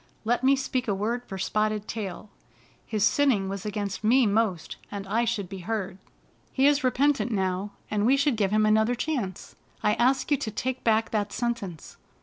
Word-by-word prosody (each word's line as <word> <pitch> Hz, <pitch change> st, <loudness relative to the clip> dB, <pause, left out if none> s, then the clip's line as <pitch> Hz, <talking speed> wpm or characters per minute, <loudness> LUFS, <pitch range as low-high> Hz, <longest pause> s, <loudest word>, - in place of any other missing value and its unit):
" -, -, -37 dB
Let 240 Hz, +2 st, +1 dB
me 270 Hz, +1 st, +5 dB
speak 260 Hz, -2 st, -2 dB
a 200 Hz, -, +1 dB
word 230 Hz, +5 st, -2 dB
for 195 Hz, -, -6 dB
Spotted 215 Hz, +2 st, -1 dB
Tail, 205 Hz, -1 st, -6 dB, 0.6 s
His 215 Hz, -2 st, -1 dB
sinning 220 Hz, -6 st, +3 dB
was 195 Hz, +1 st, -5 dB
against 205 Hz, -1 st, -3 dB
me 245 Hz, +4 st, +5 dB
most, 205 Hz, -5 st, 0 dB
and 200 Hz, -1 st, -6 dB
I 225 Hz, +4 st, +1 dB
should 200 Hz, -4 st, -2 dB
be 195 Hz, +1 st, -7 dB
heard. 195 Hz, -1 st, -4 dB, 0.5 s
He 270 Hz, -, +2 dB
is 290 Hz, 0 st, +4 dB
repentant 270 Hz, 0 st, +2 dB
now, 190 Hz, 0 st, -1 dB, 0.2 s
and 210 Hz, -1 st, +1 dB
we 260 Hz, +5 st, +4 dB
should 280 Hz, -2 st, +2 dB
give 205 Hz, -3 st, +1 dB
him 215 Hz, +1 st, +3 dB
another 220 Hz, +3 st, +3 dB
chance. 240 Hz, -, -3 dB, 0.3 s
I 210 Hz, -, +3 dB
ask 260 Hz, +6 st, +1 dB
you 290 Hz, -, +4 dB
to 225 Hz, -, -4 dB
take 255 Hz, +4 st, -3 dB
back 225 Hz, -1 st, +2 dB
that 205 Hz, -2 st, -1 dB
sentence." 210 Hz, -9 st, -4 dB
215 Hz, 190 wpm, -26 LUFS, 200-245 Hz, 0.6 s, me